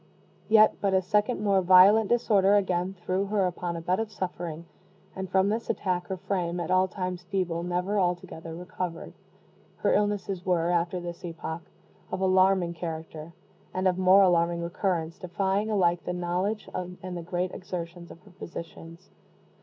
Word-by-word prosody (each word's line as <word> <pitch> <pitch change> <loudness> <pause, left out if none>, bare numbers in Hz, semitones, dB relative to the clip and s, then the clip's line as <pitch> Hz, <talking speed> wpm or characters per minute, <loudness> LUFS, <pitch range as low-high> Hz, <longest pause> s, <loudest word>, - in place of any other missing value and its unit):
Yet 215 0 +6
but 195 -1 +2
a 190 - +4
second 210 +5 +1
more 200 -2 +3
violent 190 +4 +6
disorder 205 -4 +3
again 185 -1 0
threw 185 +2 0
her 200 -1 +1
upon 175 -1 -3
a 165 - -5
bed 180 +4 0
of 225 -1 -3
suffering; 170 -4 -5 0.5
and 190 -1 -5
from 190 +1 +3
this 225 +2 -2
attack 180 -2 -1
her 190 - -3
frame, 180 -2 -2
at 170 - -3
all 185 0 +4
times 180 -1 -4
feeble, 180 -4 -1
never 180 +4 -1
altogether 175 -2 -2
recovered. 180 -1 -6 0.6
Her - - +1
illnesses 205 -3 0
were, 175 -2 +1
after 175 +1 0
this 175 -1 -7
epoch, 165 -1 -5 0.5
of 185 - -2
alarming 185 -2 +3
character, 160 -1 -7 0.4
and 185 +1 +1
of 185 0 +1
more 190 +1 +6
alarming 170 -1 +2
recurrence, 170 -1 -2
defying 195 +3 -1
alike 175 -5 +2
the 180 - -3
knowledge 180 +4 -2
and 180 0 -6
the 175 - -4
great 180 +2 -2
exertions 170 -1 -7
of 170 - -13
her 200 +1 -18
physicians. 170 0 -10
180 Hz, 160 wpm, -27 LUFS, 175-195 Hz, 0.6 s, Yet